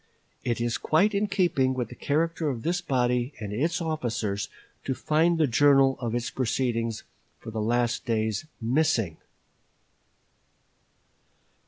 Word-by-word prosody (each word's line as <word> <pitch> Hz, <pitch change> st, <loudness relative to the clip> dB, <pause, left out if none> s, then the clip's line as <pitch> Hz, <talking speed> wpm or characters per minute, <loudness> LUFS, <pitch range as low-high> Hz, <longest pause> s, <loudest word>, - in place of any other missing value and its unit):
It 120 Hz, -2 st, -1 dB
is 120 Hz, -1 st, -1 dB
quite 195 Hz, +8 st, +3 dB
in 200 Hz, +1 st, +1 dB
keeping 175 Hz, -10 st, +1 dB
with 125 Hz, -3 st, -2 dB
the 125 Hz, -, -10 dB
character 160 Hz, +3 st, 0 dB
of 120 Hz, -5 st, -4 dB
this 175 Hz, +2 st, 0 dB
body 125 Hz, -4 st, 0 dB
and 105 Hz, -2 st, -5 dB
its 160 Hz, +9 st, 0 dB
officers 115 Hz, -11 st, -2 dB, 0.3 s
to 130 Hz, -, -2 dB
find 165 Hz, +5 st, +2 dB
the 160 Hz, -, +4 dB
journal 135 Hz, +1 st, +4 dB
of 120 Hz, -2 st, -2 dB
its 120 Hz, 0 st, -2 dB
proceedings 115 Hz, -3 st, -1 dB, 0.3 s
for 110 Hz, -, -9 dB
the 110 Hz, -1 st, -3 dB
last 120 Hz, +2 st, +1 dB
days 110 Hz, +5 st, -1 dB
missing." 115 Hz, -, +1 dB
130 Hz, 135 wpm, -27 LUFS, 115-155 Hz, 0.3 s, the